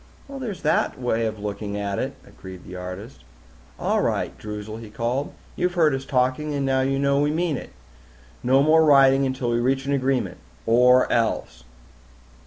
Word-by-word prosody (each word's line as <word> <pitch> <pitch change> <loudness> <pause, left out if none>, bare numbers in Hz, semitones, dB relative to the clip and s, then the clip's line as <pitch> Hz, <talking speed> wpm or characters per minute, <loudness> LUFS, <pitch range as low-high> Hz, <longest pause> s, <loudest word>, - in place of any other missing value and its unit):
"There's 260 -8 -6
that - - +1
way 115 -2 0
of 110 0 -5
looking 100 0 -5
at 100 -1 -2
it," - - -3
agreed 95 -1 -12
the 90 - -10
artist. 90 - -8 0.6
"All - - +1
right, - - -1
Droozle," 105 0 -6
he 115 -2 -10
called. 120 +6 -2 0.2
"You 180 - +1
heard 165 -5 +2
us 135 0 -3
talking 130 +3 0
and 135 -1 +1
you 135 - 0
know 140 0 +2
we 145 +1 +2
mean 160 0 0
it. - - -7 0.7
No 130 +2 +3
more 160 +2 +5
writing 135 -2 +5
until 130 -2 -2
we 120 - +1
reach 135 +2 0
an 140 - 0
agreement 135 -1 0 0.3
or 125 +2 +5
else!" - - -1
130 Hz, 170 wpm, -23 LUFS, 110-140 Hz, 0.7 s, more